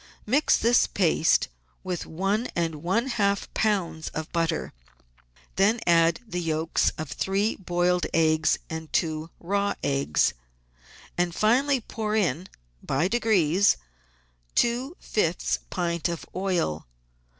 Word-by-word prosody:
Mix 280 +8 +3
this 235 +1 +4
paste 165 -4 +2 0.4
with 180 -2 -4
one 195 +8 -1
and 165 -3 -2
one 190 +8 +1
half 200 -6 0
lbs. 190 -7 0
of 155 0 -4
butter; 165 -2 -1 0.8
then 205 +5 +3
add 165 +2 +4
the 180 -4 -3
yolks 160 0 +1
of 155 - -4
three 200 +3 0
boiled 175 -1 0
eggs 155 -1 +3
and 160 -1 -7
two 155 -1 -1
raw 200 +3 0
eggs, 70 +2 +1 0.9
and 175 -1 0
finally 260 +5 +2
pour 215 -1 -3
in, 185 -3 0 0.3
by 140 +6 0
degrees, 200 -5 +3 0.8
two 250 +7 +1
fifths 175 -5 0
pint 170 -1 -1
of 170 -2 -5
oil. 180 - -1
180 Hz, 115 wpm, -26 LUFS, 165-210 Hz, 0.9 s, this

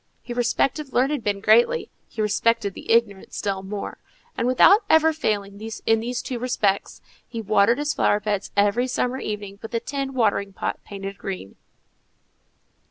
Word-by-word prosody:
He 240 - -6
respected 260 +4 0
learned 270 +1 +1
men 200 -1 -1
greatly; 235 - +3 0.2
he 220 - -3
respected 210 0 +1
the - - -6
ignorant 220 -4 +1
still 195 -2 -2
more; 200 +1 -6 0.4
and, 235 - -1
without 390 - +6
ever 320 0 +5
failing 205 -8 -2 0.2
in 225 0 +4
these 240 +2 -3
two 250 -2 -4
respects, 210 -5 -1 0.2
he 230 - -6
watered 215 +2 +3
his 295 +1 -1
flower 205 - +2
beds 205 -1 -2
every 205 +5 +3
summer 250 0 -1
evening 205 -3 -5
with 225 +1 -6
a - - +2
tin 275 +1 -4
watering 205 -4 +1
pot - - -3
painted 195 0 -7
green. 185 - -6
225 Hz, 160 wpm, -23 LUFS, 200-250 Hz, 0.4 s, without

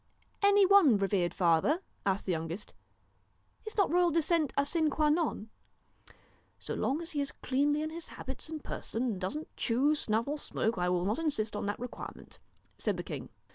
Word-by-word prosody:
'Any 405 0 +6
one, 370 - +6
revered 195 -3 +1
father?' 175 - +3 0.3
asked 195 0 0
the 190 - 0
youngest. 165 +4 -4 0.4
' - - -39
Is 435 - -6
not 400 -5 +3
royal 350 0 +4
descent 325 -1 +2
a 280 - +3
sine 315 +1 +1
qua 300 +1 +2
non? 300 -8 0 0.3
' - - -20
' - - -31 0.3
So - - -5
long 290 +6 -1
as 330 - -4
he 290 - -1
is 280 - -2
cleanly 290 +3 0
in 310 - -3
his 335 0 -7
habits 265 +3 -6
and 315 -2 -6
person, 230 - -3
and 220 -7 -2
doesn't 295 +12 -4
chew, 265 +6 +2
snuff, 230 -5 0
or 295 +1 -2
smoke, 225 -7 -1
I 180 0 +1
will 180 0 +1
not 210 +7 0
insist 225 -10 -1
on 205 - -2
that 205 - -2
requirement,' 245 0 -8 0.4
said - - 0
the - - -4
king. - - -6
280 Hz, 200 wpm, -31 LUFS, 205-315 Hz, 0.4 s, Any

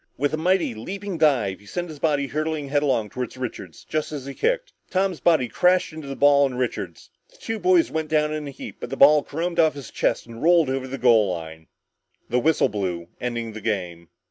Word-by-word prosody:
With 145 +2 0
a - - +1
mighty 180 -3 +1
leaping 190 - -6
dive, 125 -12 +2
he 100 - -19
sent 175 - -4
his 155 -2 -9
body 145 -3 +1
hurtling 155 0 -3
headlong 140 -6 +1
toward 125 +3 -6
Richards 110 -9 -7
just 155 -1 -2
as 145 -4 -6
he 140 - -6
kicked. - - -1 0.2
Tom's 190 -2 0
body 160 -7 +3
crashed 180 +6 +2
into 155 -2 -8
the 135 - -5
ball 140 0 +5
and 125 -2 -6
Richards. 125 -1 -4 0.2
The - - -23
two 225 - -4
boys 365 -2 +3
went 160 -1 -2
down 150 -1 +1
in 155 -1 -4
a - - -5
heap 135 - -9
but - - -6
the 135 - -5
ball 150 +2 +7
caromed 170 +3 -3
off 160 -3 +4
his 140 -5 -9
chest 115 - 0
and 115 -1 -11
rolled 165 -4 +4
over 130 0 -2
the 135 +1 -5
goal 115 -6 +4
line. 80 -2 -7 0.6
The 125 - +2
whistle 155 +1 +3
blew 90 -5 -3
ending 120 -2 -3
the 110 0 -8
game. 90 -6 -3
140 Hz, 220 wpm, -23 LUFS, 115-160 Hz, 0.6 s, ball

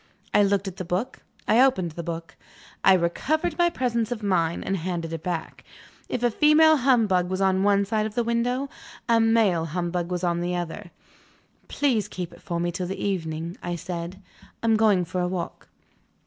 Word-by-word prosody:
I - - +5
looked 200 0 +2
at 190 -1 -6
the 185 - -4
book; 185 +7 -3 0.3
I 230 +3 +5
opened 190 -11 +2
the 170 - -6
book; 165 0 -6 0.5
I 190 - +7
recovered 300 - 0
my 345 0 +5
presence 235 -6 -1
of 230 -3 -4
mind, 170 -4 0
and 195 - 0
handed 170 -1 -4
it 165 - -4
back. 170 -2 -4 0.5
If 245 - -2
a 240 - +3
female 305 +5 +5
humbug 220 -9 +2
was 185 0 -2
on 190 -1 +2
one 200 0 +3
side 215 +1 0
of 215 - -10
the 240 - +1
window, 245 +4 0 0.4
a 230 -1 +4
male 225 -7 +3
humbug 175 +1 -2
was 180 0 -3
on 170 -1 +1
the 175 +1 -1
other. 175 +2 -5 0.8
"Please 250 -8 0
keep 175 -2 -6
it 170 - -16
for 170 -1 -3
me 175 0 0
till 180 0 -4
the 190 - -4
evening," 165 -3 -3
I 175 0 -3
said; 180 +2 -6 0.4
"I - - -1
am 225 -1 +4
going 210 -5 +3
for 180 +2 -3
a 180 - 0
walk." 180 -2 -5
190 Hz, 195 wpm, -25 LUFS, 175-225 Hz, 0.8 s, I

